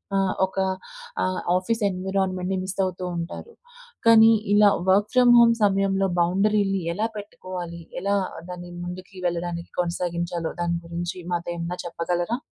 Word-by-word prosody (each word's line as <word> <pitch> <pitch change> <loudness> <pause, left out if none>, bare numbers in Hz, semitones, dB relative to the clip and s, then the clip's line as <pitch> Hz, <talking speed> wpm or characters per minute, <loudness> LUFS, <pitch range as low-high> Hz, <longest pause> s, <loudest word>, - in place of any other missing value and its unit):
ఆహ్, 195 -1 +2
ఒక 190 +1 -13 0.7
ఆహ్, 185 0 -1 0.2
ఆఫీస్ 225 +5 -1
ఎన్విరాన్మెంట్‌ని 190 0 -1
మిస్ 190 +1 -5
అవుతూ 185 0 -4
ఉంటారు. 170 - -6 0.5
కానీ, 225 0 +8 0.2
ఇలా 205 0 +7 0.2
వర్క్ 205 +2 +4
ఫ్రమ్ 245 -1 +7
హోమ్ 230 0 +7
సమయంలో 195 -1 +2
బౌండరీలని 195 +2 +2
ఎలా 215 +5 0
పెట్టుకోవాలి? 180 -4 -7 0.2
ఎలా 200 +1 +1 0.3
దాన్ని 175 0 -7
ముందుకి 185 +2 -8
వెళ్ళడానికి 170 0 -4
కొనసాగించాలో 170 -1 -2
దాని 170 0 0
గురించి 170 +2 -4 0.2
మాతో 170 0 -2
ఏమన్నా 170 +1 -4
చెప్పగలరా? 175 +5 -1
185 Hz, 130 wpm, -24 LUFS, 175-200 Hz, 0.7 s, కానీ